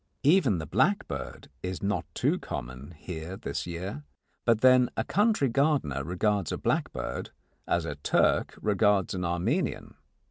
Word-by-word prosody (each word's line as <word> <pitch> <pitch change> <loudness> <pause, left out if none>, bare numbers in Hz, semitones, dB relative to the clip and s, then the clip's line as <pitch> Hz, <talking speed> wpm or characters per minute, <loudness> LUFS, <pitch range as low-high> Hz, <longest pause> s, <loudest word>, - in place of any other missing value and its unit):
Even 140 - +4
the 80 - -4
blackbird 195 - -1
is 90 +1 -4
not 100 -3 0
too - - +1
common 65 +6 -7
here 85 +3 -6
this - - -4
year, 85 -3 -5 0.4
but 115 -2 +3
then 130 -1 +6
a - - +1
country 210 -8 +2
gardener 130 - +1
regards 95 +2 0
a - - -2
blackbird - - -2 0.4
as 85 -1 +1
a 75 - -3
Turk 70 0 +1
regards 105 -2 +2
an 90 -1 -3
Armenian. 85 0 -1
95 Hz, 140 wpm, -28 LUFS, 85-125 Hz, 0.4 s, then